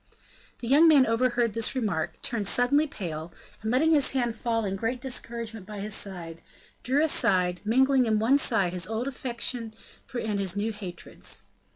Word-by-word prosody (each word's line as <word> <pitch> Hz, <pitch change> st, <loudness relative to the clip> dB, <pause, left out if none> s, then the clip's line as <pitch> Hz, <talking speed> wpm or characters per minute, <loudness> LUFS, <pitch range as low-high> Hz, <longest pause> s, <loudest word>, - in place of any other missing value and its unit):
The 235 Hz, -, -5 dB
young 295 Hz, +6 st, +6 dB
man 290 Hz, -5 st, +7 dB
overheard 235 Hz, -1 st, +1 dB
this 230 Hz, +3 st, 0 dB
remark, 195 Hz, -11 st, -2 dB
turned 215 Hz, -4 st, -1 dB
suddenly 280 Hz, +8 st, +3 dB
pale, 170 Hz, -, -6 dB, 0.3 s
and, 220 Hz, -, -3 dB
letting 280 Hz, +7 st, +3 dB
his 290 Hz, -4 st, +4 dB
hands 240 Hz, -4 st, 0 dB
fall 225 Hz, -1 st, -1 dB
in 195 Hz, -1 st, -2 dB
great 230 Hz, +5 st, -2 dB
discouragement 230 Hz, -5 st, -3 dB
by 210 Hz, -1 st, -7 dB
his 210 Hz, +1 st, -2 dB
side, 175 Hz, -5 st, -4 dB, 0.4 s
drew 270 Hz, +5 st, +2 dB
aside, 180 Hz, -, +2 dB
mingling 260 Hz, +3 st, +3 dB
in 215 Hz, -1 st, +2 dB
one 240 Hz, +6 st, +3 dB
sigh 220 Hz, -9 st, +1 dB
his 180 Hz, 0 st, -2 dB
old 225 Hz, +4 st, -2 dB
affection 240 Hz, -3 st, -4 dB, 0.4 s
and 210 Hz, -3 st, -2 dB
his 190 Hz, -2 st, -1 dB
new 215 Hz, +2 st, -1 dB
hatreds. 185 Hz, -5 st, -5 dB
225 Hz, 170 wpm, -27 LUFS, 200-255 Hz, 0.4 s, man